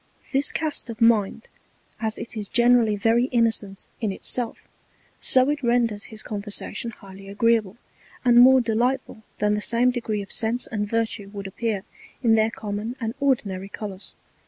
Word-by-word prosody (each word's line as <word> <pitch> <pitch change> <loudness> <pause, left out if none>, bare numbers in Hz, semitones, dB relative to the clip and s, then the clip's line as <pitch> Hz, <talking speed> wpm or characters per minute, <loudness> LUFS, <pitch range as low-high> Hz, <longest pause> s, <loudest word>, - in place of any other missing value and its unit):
This 275 +1 +2
Cast 310 -5 -1
of 230 -1 -7
Mind, 225 -2 +2 0.5
as 220 -1 -1
it 235 - -7
is 210 -2 -5
generally 235 -2 +4
very 225 +4 +2
innocent 225 -5 0
in 220 -4 -1
it 190 - -9
self, 245 -2 0 0.5
so 255 0 +4
it 295 0 -3
renders 235 -4 +1
his 220 -1 -8
Conversation 205 +2 -4
highly 195 -2 -12
agreeable, 220 0 +1 0.5
and 240 -1 +6
more 260 +1 +7
delightful 240 +1 -1 0.2
than 210 0 +1
the 210 - -1
same 240 +3 +3
Degree 220 -4 -3
of 195 - -13
Sense 230 +2 +1
and 210 -2 -3
Virtue 225 -3 -1
would 200 -1 -8
appear 200 0 -3 0.4
in 230 -2 +4
their 220 0 +3
common 215 +2 -5
and 225 -2 -3
ordinary 200 -9 -1
Colours. 200 -2 -8
225 Hz, 160 wpm, -24 LUFS, 205-240 Hz, 0.5 s, more